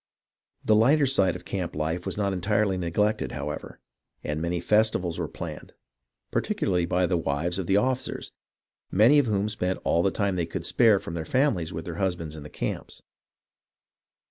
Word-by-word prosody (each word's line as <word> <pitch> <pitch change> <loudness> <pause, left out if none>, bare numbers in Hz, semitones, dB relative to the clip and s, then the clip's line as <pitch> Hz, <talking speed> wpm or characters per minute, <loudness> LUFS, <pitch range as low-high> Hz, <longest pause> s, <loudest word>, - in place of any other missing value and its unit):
The 110 - +4
Hghter 140 +7 +4
side 95 -9 +2
of - - -9
camp 90 -3 -3
life 80 +4 -2
was 95 - -3
not 100 -2 0
entirely 100 +2 +1
neglected, 90 +5 0
however, 75 +1 -5 0.4
and 75 +1 -3
many 85 +1 -1
festivals 100 -3 +1
were - - -1
planned, - - -8 0.6
particularly 90 -1 0
by 90 +1 +2
the 90 0 +1
wives 80 +4 -1
of 90 - -3
the 95 - +3
officers, 130 +4 -1 0.6
many 115 +10 +5
of 140 - +2
whom 105 -1 +1
spent 95 -3 -2
all 85 - +2
the 95 - +3
time 100 -1 -1
they 85 -2 -1
could 85 0 -5
spare 115 -1 +4
from 85 - -6
their 85 -1 -3
families 115 - +1
with 80 +1 -6
their 85 -2 -6
husbands 85 -5 -2
in 75 - -8
the 75 - -9
camps. - - -5
90 Hz, 175 wpm, -26 LUFS, 85-105 Hz, 0.6 s, many